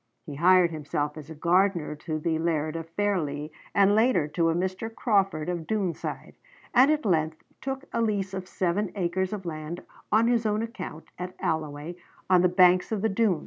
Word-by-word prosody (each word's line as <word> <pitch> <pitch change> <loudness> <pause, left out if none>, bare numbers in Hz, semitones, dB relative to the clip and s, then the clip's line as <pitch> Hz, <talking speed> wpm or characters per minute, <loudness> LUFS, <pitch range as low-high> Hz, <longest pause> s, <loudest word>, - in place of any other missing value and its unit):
He 150 - -7
hired 175 +3 +5
himself 150 -1 -3
as 155 0 -10
a 160 - -8
gardener 175 0 +2
to 155 +1 -4
the 160 +1 -1
laird 160 -1 -1
of 165 0 -5
Fairlie, 155 -8 -1 0.2
and 200 0 +5
later 220 - +3
to 165 +1 +1
a 165 - +1
Mr. 185 +5 -2
Crawford 195 -9 +1
of 175 -3 -3
Doonside, 200 -6 -3 0.4
and 255 +2 +6
at 305 -3 +1
length 160 -4 0 0.2
took 270 0 -4
a 230 - +1
lease 200 -4 -1
of 190 -1 -5
seven 190 +2 -1
acres 185 0 -1
of 205 -3 -5
land 155 +1 -5 0.3
on 220 +2 +4
his 235 -2 +2
own 210 +1 0
account 185 -8 -7
at 180 +1 -5
Alloway 155 +1 -3 0.3
on 180 -1 +6
the 180 - +4
banks 180 +1 +4
of 215 -2 -1
the 220 - +3
Doon. 195 -4 +2
180 Hz, 185 wpm, -27 LUFS, 160-205 Hz, 0.4 s, and